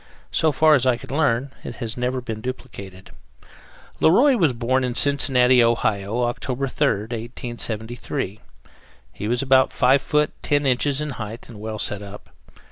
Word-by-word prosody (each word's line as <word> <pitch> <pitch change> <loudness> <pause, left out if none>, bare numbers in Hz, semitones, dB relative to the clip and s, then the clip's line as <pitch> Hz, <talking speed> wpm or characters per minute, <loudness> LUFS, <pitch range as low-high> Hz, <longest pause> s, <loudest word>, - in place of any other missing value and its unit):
So 160 - +2
far 155 +2 +4
as 130 -3 +3
I 125 -2 +3
could 120 - -11
learn, 140 -3 +1
it - - -7
had 115 -3 -4
never 125 +1 -2
been 110 -3 -6
duplicated. 100 -7 -8 0.9
Le - - +5
Roy 260 - +5
was 165 - +3
born 125 +2 0
in 125 -1 -2
Cincinnati, 130 -3 +3
Ohio, 115 -1 0
October 125 +2 -2
3rd, 125 -5 -1
1873. 115 -1 -4 0.7
He 105 - -5
was 120 +3 0
about 130 -1 +4
5 130 +2 +3
feet 150 0 +1
10 145 -1 +1
inches 135 +2 +1
in 150 -1 -3
height, 110 -2 -7
and 110 -4 -11
well 110 0 -5
set 105 -1 -3
up. 100 0 -11
125 Hz, 160 wpm, -22 LUFS, 115-135 Hz, 0.9 s, Le